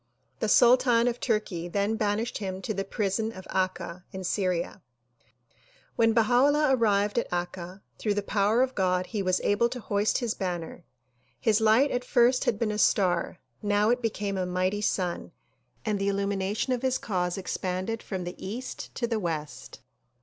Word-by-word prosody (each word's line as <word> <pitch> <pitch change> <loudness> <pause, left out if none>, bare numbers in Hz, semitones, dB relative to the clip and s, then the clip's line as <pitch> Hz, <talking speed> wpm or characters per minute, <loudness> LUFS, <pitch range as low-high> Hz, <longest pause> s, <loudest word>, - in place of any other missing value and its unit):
The 220 - 0
sultan 245 0 +5
of 245 0 -1
Turkey 210 -7 -1
then 200 +4 0
banished 215 +2 -1
him 190 -2 -4
to 215 - -2
the 195 -1 -2
prison 210 +2 -1
of 190 -4 -10
Akka 185 -1 -2
in 190 0 -6
Syria. 185 -2 -1 1.1
When 225 -1 +4
Baha 230 +1 +2
'Ullah 290 -2 +3
arrived 210 -2 +2
at - - -4
Akka, 175 +1 -4 0.2
through 210 -2 0
the 205 - -1
power 210 +4 +2
of 260 0 -2
God 185 -3 +1
he 210 +1 -3
was 185 -1 +1
able 205 +4 +2
to 250 - -5
hoist 205 -1 0
his 235 -4 -1
banner. 175 -2 -4 0.6
His 220 -1 +2
light 225 +6 +4
at 245 - -1
first 250 +1 +3
had 215 - +1
been 215 -1 0
a 210 - -3
star; 180 -4 +2 0.2
now 205 +1 +2
it 245 +1 +1
became 205 -4 -2
a 180 - -1
mighty 185 +3 0
sun 180 -4 -2 0.5
and 210 -2 0
the 195 - -1
illumination 200 +4 0
of 245 - -2
his 260 -1 +1
cause 180 -3 -2
expanded 190 +3 -3
from 190 -3 -5
the 175 0 -5
east 230 +7 -6
to 240 - -1
the 230 -2 -1
west. 155 -5 -5
205 Hz, 175 wpm, -27 LUFS, 185-230 Hz, 1.1 s, sultan